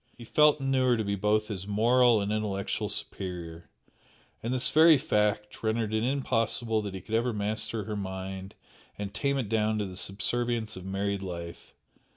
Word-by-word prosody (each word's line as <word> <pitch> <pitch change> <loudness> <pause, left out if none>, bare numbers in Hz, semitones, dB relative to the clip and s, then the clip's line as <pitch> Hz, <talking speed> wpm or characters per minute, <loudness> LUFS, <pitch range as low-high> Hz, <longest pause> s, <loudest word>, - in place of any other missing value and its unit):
He 120 - -10
felt 150 +5 +4
and 135 -1 -1
knew 130 -1 +3
her 120 -1 +4
to 110 - 0
be 100 -1 -1
both 105 +2 +1
his 100 -3 -5
moral 115 +2 +4
and 100 +1 -2
intellectual 105 -2 -2
superior, 85 -3 -4 0.7
and 115 - -3
this 125 -1 0
very 160 0 +7
fact 105 -5 0
rendered 110 -1 0
it 110 - +1
impossible 120 -4 0
that 100 -2 -5
he 95 - -6
could 110 - -9
ever 120 +2 +1
master 110 +1 -2
her 105 +1 -4
mind 95 -1 -5 0.4
and 100 -1 -5
tame 140 -1 0
it 130 -5 -1
down 110 0 +1
to 105 - -1
the 95 -1 -8
subservience 110 +3 -1
of 95 0 -9
married 100 +1 -2
life. 85 -3 -7
105 Hz, 185 wpm, -28 LUFS, 100-120 Hz, 0.7 s, very